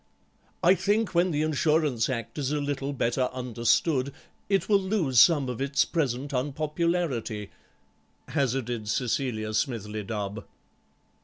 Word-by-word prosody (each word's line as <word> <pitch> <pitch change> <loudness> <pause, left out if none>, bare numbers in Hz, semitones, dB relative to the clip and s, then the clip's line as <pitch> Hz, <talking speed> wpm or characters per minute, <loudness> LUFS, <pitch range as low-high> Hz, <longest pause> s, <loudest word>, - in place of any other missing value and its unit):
"I 180 +2 +7
think 205 +3 0
when 175 +2 +3
the 150 -2 0
Insurance 150 -5 +1
Act 115 +1 -4
is 140 -1 -1
a 150 - 0
little 140 -1 -2
better 125 -1 0
understood 125 +3 +1 0.4
it 195 -3 +1
will 205 -2 +4
lose 185 - +2
some 150 -3 +6
of 125 0 -4
its 140 +1 +2
present 140 -3 -2
unpopularity," 145 - -1 0.8
hazarded 125 -6 -1
Cecilia 115 -3 -1
Smithly 110 -4 -2
Dubb. 105 0 -4
135 Hz, 125 wpm, -27 LUFS, 115-155 Hz, 0.8 s, I